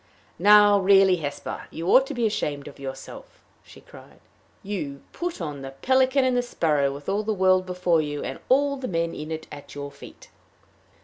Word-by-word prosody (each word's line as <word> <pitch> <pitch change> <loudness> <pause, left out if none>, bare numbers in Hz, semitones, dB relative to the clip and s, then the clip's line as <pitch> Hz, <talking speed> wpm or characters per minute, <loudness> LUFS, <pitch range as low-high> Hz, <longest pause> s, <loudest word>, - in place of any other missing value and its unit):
"Now 205 +1 +6
really, 195 -1 +5
Hesper, 145 -3 -6
you 165 +2 -6
ought 265 +1 +5
to 285 - -6
be 240 -2 0
ashamed 150 -9 -2
of 145 - -12
yourself," 135 -1 -9 0.2
she - - -16
cried. - - -16 0.4
"You 190 -8 -4
to 140 - -16 0.2
put 350 0 -3
on 150 -5 -5
the 135 0 -8
pelican 260 +1 +3
and 255 -1 +1
the 245 - +2
sparrow, 150 - 0
with 140 +1 -10
all 200 +2 0
the 215 0 -2
world 185 -1 +3
before 180 -3 +1
you, 145 -1 -4
and - - -5
all 280 +2 +3
the 260 -1 -5
men 170 -1 -1
in 155 +1 -7
it 160 0 -5
at 145 -1 -11
your 140 0 -6
feet!" 140 - -14
180 Hz, 195 wpm, -24 LUFS, 145-215 Hz, 0.4 s, Now